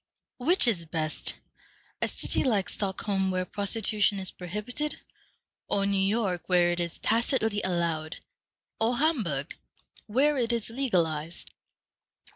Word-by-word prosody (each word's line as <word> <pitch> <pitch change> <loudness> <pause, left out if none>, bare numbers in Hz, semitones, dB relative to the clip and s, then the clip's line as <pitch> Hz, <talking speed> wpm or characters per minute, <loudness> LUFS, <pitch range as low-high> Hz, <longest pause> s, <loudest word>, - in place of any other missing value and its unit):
Which 320 +3 +4
is 175 -8 +1
best, 155 -1 -2 0.7
a - - +2
city - - -1
like 210 -8 +1
Stockholm, 190 -1 -1
where 185 0 0
prostitution 205 0 +1
is 190 -1 +1
prohibited, 210 - -4 0.7
or 200 -1 +2
New 200 -1 +1
York, 195 -3 0
where 175 -1 +5
it 175 - -1
is 170 -1 -2
tacitly 225 -2 +1
allowed, 170 -4 -1 0.6
or 235 +2 +2
Hamburg, 210 - 0 0.5
where 275 +6 +3
it 235 -1 +1
is 230 -1 -2
legalized?" 170 - -1
200 Hz, 120 wpm, -28 LUFS, 175-230 Hz, 0.7 s, where